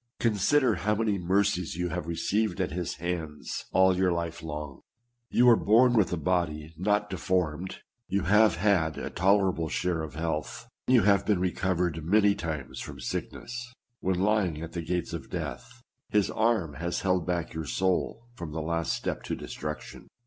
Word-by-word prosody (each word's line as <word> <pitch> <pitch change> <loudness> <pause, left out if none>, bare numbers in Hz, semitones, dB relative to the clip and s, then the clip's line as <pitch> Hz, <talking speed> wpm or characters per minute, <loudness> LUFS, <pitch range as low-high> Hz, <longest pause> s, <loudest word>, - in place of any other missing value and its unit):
Consider 115 +2 +3
how 105 +3 +2
many 105 -2 0
mercies 90 -1 +1
you 90 +1 -1
have 85 -1 -4
received 90 +4 0
at - - 0
his 90 +1 -3
hands 80 -4 -4
all 95 0 +5
your 90 0 +2
life 85 -1 -3
long! 75 -3 -6 0.5
You 125 - +4
are 120 - +9
born 115 +4 +4
with 110 -5 +3
a 90 - 0
body 80 -2 -1
not 105 +4 +1
deformed; 90 -2 -2 0.3
you 100 -2 0
have 105 +4 +5
had 85 -4 +2
a - - -4
toler 95 +1 +3
able 80 -1 -3
share 90 -1 -1
of 80 -2 -6
health; 80 -1 -3 0.2
you 125 -4 +5
have 100 -1 +3
been 105 -4 +3
recovered 90 -3 0
many 100 +4 +4
times 80 -7 -5
from - - -7
sickness; 120 0 -5 0.3
when 90 -1 0
lying 95 -5 +1
at 85 - -7
the 85 - -4
gates 90 +2 -2
of - - -6
death, - - -6 0.3
his 105 -2 +2
arm 110 -9 +1
has 85 +1 -2
held 90 -3 +1
back 85 -2 -1
your 80 -1 -4
soul 95 +7 -1
from 85 -9 -7
the 80 - -2
last 85 0 -1
step - - -3
to - - -2
destruction. 75 +1 -7
90 Hz, 175 wpm, -28 LUFS, 80-100 Hz, 0.5 s, are